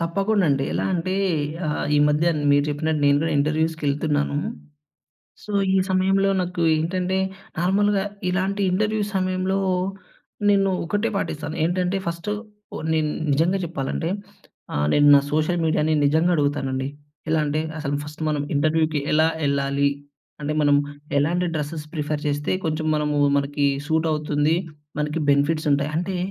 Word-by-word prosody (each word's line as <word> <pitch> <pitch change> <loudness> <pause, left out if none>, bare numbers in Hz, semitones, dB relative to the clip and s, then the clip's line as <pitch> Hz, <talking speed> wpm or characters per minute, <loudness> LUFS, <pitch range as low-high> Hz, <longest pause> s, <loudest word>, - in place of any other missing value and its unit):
తప్పకుండండి. 170 -5 +1
ఎలా - - -1
అంటే, 185 +2 -1 0.5
ఆహ్, 150 - -1
ఈ - - +4
మధ్యన 155 +2 +2
మీరు 145 0 +4
చెప్పినట్టు 155 +1 -1
నేను 140 0 +4
గూడా 160 -1 0
ఇంటర్‌వ్యూస్‌కెళ్తున్నాను 150 -1 0 1.1
సో, 210 - -7 0.2
ఈ - - +4
సమయంలో 195 +1 +2
నాకు 180 -1 -3
ఏంటంటే, 180 +3 -1 0.4
నార్మల్‍గా 195 +2 +2 0.3
ఇలాంటి 195 +2 -1
ఇంటర్‌వ్యూ‌‌ 210 +1 0
సమయంలో, 185 +1 0 0.9
నేను 195 -1 +3
ఒకటే 205 +6 -1
పాటిస్తాను. 155 -4 -3
ఏంటంటే, 180 +2 0
ఫస్టు 170 +5 -3 0.4
ఓ - - -4 0.2
నేను 155 -1 +1 0.2
నిజంగా 170 +7 +2
చెప్పాలంటే, 160 0 -3 0.7
ఆహ్, 75 0 +1
నేను 145 0 +4
నా - - +5
సోషల్ 155 +3 +1
మీడియాని 155 0 +2
నిజంగ 160 +4 +3
అడుగుతానండి. 135 -2 -1 0.4
ఎలా 160 -1 +3
అంటే, 150 +2 0 0.2
అసలు 145 -1 -2
ఫస్ట్ 150 +2 -9
మనం 145 -1 -1
ఇంటర్‌వ్యూ‌‌కి 155 0 +1
ఎలా 155 +1 +4 0.2
యెళ్ళాలి? 140 0 +1 0.5
అంటే, 150 +1 -1
మనం 145 -1 +4 0.4
ఎలాంటి 175 +5 +1
డ్రసెస్ 150 +1 -4
ప్రిఫర్ 150 -1 -2
చేస్తే 145 0 -1
కొంచెం 155 0 -1
మనమూ 150 -1 0 0.2
మనకీ 145 0 0 0.2
సూటవుతుంది. 155 -1 +1 0.4
మనకి 150 +2 -1
బెనిఫిట్సుంటాయి. 145 0 +2
అంటే, 180 +2 -2
155 Hz, 130 wpm, -23 LUFS, 145-180 Hz, 1.1 s, నా